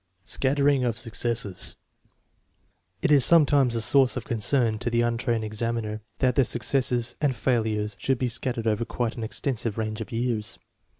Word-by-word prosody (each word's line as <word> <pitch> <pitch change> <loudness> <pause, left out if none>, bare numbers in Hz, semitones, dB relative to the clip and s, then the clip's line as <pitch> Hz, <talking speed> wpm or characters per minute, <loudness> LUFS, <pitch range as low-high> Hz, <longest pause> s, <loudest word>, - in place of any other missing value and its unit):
Scattering 140 +2 +1
of 120 -3 -1
successes. 115 -5 -2 1.3
It - - +2
is 140 -3 +6
sometimes 145 -6 +4
a 115 - 0
source 135 +2 +3
of - - -5
con 120 -6 -3
cern 115 -1 +2
to 120 +1 -2
the 120 0 +1
untrained 115 -1 0
examiner 110 0 -3 0.2
that 130 -1 +2
the 135 - +4
successes 120 0 0
and 140 -4 +1
fail 120 -1 +1
ures 105 -1 -2
should 135 -1 0
be 125 - -1
scattered 120 -1 -2
over 110 +1 +1
quite 120 0 -3
an 115 - -5
extensive 115 -1 -2
range 110 -1 -3
of 110 - -7
years. 115 -2 -2
120 Hz, 170 wpm, -25 LUFS, 110-130 Hz, 1.3 s, is